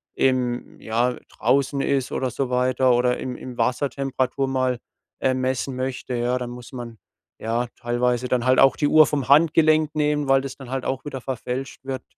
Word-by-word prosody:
im 125 -2 0
ja, 120 +3 0 0.2
draußen 135 +4 +1
ist, 135 -3 0
oder 130 -2 -1
so 130 +2 -2
weiter, 125 0 +2
oder 125 0 +2
im 125 -1 -4
im 125 -1 -9
Wasser 125 +4 +1
Temperatur 135 0 -1
mal, 130 -2 0 0.4
äh, 130 - +2
messen 130 +1 -1
möchte, 130 0 -3
ja, 120 +1 0
dann 125 -1 -4
muss 120 0 -10
man 120 -3 -8 0.4
ja 115 +2 -1
teilweise 120 0 0
dann 125 -1 0
halt 130 0 +4
auch 135 -1 +6
die 145 - +1
Uhr 155 +1 +7
vom 140 -2 -2
Handgelenk 155 +1 +4
nehmen, 150 -1 0
weil 135 0 +4
das 135 -1 -6
dann 135 -3 -11
halt 135 -1 -3
auch 130 +2 -3
wieder 135 -3 -5
verfälscht 130 +1 -5
wird. 130 -2 -4
130 Hz, 185 wpm, -23 LUFS, 125-135 Hz, 0.4 s, Uhr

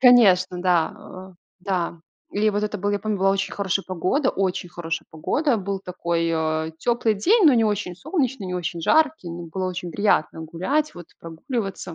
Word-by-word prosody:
Конечно, 195 -8 +6
да, 175 -3 +2 0.4
э 185 - -20 0.3
да. 180 -3 -2 0.3
Или 215 +1 +2
вот 205 0 -1
это 210 0 -2
был 205 +2 0
я 205 - 0
помню, 210 0 -2
была 195 +1 +3
очень 195 0 -1
хорошая 195 -1 -1
погода 185 - 0
очень 185 -2 -1
хорошая 165 -1 -4
погода. 260 - 0
Был 195 -1 -3
такой, 170 -2 -1
э, 160 -1 0
тёплый 235 +1 +1
день, 380 - +4
но 280 - +7
не 230 -2 +4
очень 205 -4 -1
солнечный, 265 - -2
не 180 - -4
очень 170 -1 -3
жаркий. 310 - +2
М, 170 0 -7
было 185 +3 -3
очень 180 -1 -5
приятно 200 -3 +1
гулять, 285 - 0
вот, 175 -2 -10
прогуливаться. 185 - -5
195 Hz, 180 wpm, -23 LUFS, 175-220 Hz, 0.4 s, но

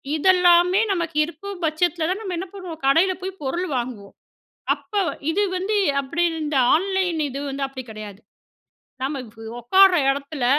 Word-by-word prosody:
இதெல்லாமே 360 +2 +5
நமக்கு 335 -4 -2
இருக்குபட்சத்துல 340 -1 -2
நம்ம 380 -4 -4
என்ன 370 +2 -4
பண்ணுவோம். 360 -5 -8
கடைல 350 +7 +4
போய் 380 0 -6
பொருள் 345 +7 -2
வாங்குவோம். 235 -5 -6 0.6
அப்ப - - -21 0.4
இது 410 +5 +1
வந்து 390 +4 -1 0.3
அப்படின்னு 335 +4 -1
இந்த 295 -2 -2 0.2
ஆன்லைன் 375 -1 0
இது 275 +1 -5
வந்து 275 0 -3
அப்படி 265 -1 -8
கிடையாது. 210 -1 -9 0.8
நாம 275 0 -2 0.4
உக்கார 380 +10 +6 0.2
எடத்துல 280 -1 -3
335 Hz, 130 wpm, -22 LUFS, 275-370 Hz, 0.8 s, உக்கார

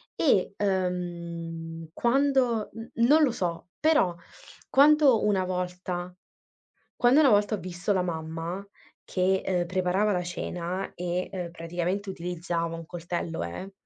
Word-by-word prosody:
E 200 - +2
ehm, 170 -4 -3
quando 250 -2 +2
n 225 +2 -8 0.2
non 305 +3 +6
lo 275 - +4
so 175 -4 -3
però 300 - +3 0.6
quando 285 -4 +6
una 195 -3 +2
volta 180 0 -4 0.8
quando 250 +5 +5
una 285 -4 +6
volta 205 0 +3
ho - - -1
visto 180 +2 -2
la 185 - +2
mamma 165 +2 -4 0.4
che, 190 +1 +1
ehm, 180 -2 +1
preparava 185 +3 +1
la 180 -2 0
cena 175 +1 -4
e, 180 +1 -2
ehm, 180 -3 -4
praticamente 175 +4 -3
utilizzava 170 -1 -3
un 165 - -8
coltello 170 - -4
eh, 135 - -6
180 Hz, 130 wpm, -27 LUFS, 170-205 Hz, 0.8 s, non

